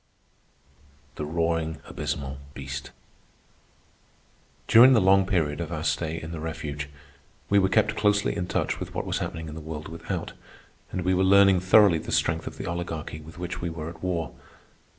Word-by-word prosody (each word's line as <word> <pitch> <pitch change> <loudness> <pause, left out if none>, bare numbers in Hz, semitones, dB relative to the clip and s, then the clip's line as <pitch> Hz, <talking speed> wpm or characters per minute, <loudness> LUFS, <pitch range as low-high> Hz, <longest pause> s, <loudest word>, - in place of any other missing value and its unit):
THE 75 - -5
ROARING 80 0 -1
ABYSMAL 70 -1 -4 0.2
BEAST 70 0 -6 1.8
During 125 +4 +8
the 115 - +6
long 95 0 +4
period 80 -7 0
of - - -5
our - - -3
stay 80 0 -1
in 80 0 -7
the 85 - -5
refuge, 75 -3 -5 0.6
we 100 - +6
were 95 -1 +2
kept 110 +1 +2
closely 105 -1 +2
in 90 - -2
touch - - -1
with - - -7
what - - -2
was - - -1
happening 80 -1 -4
in 75 - -7
the 80 - -7
world 80 0 -7
without, 80 +1 -5 0.6
and 90 - -3
we 95 +1 +2
were 95 +1 +2
learning 100 -1 +6
thoroughly 95 -1 +5
the - - -7
strength 80 0 +1
of - - -7
the - - -5
Oligarchy 85 -3 -4
with 80 +3 -13
which 90 0 -5
we 85 - -2
were 80 -1 -5
at 85 -1 -12
war. 90 -3 -2
85 Hz, 175 wpm, -26 LUFS, 80-95 Hz, 1.8 s, During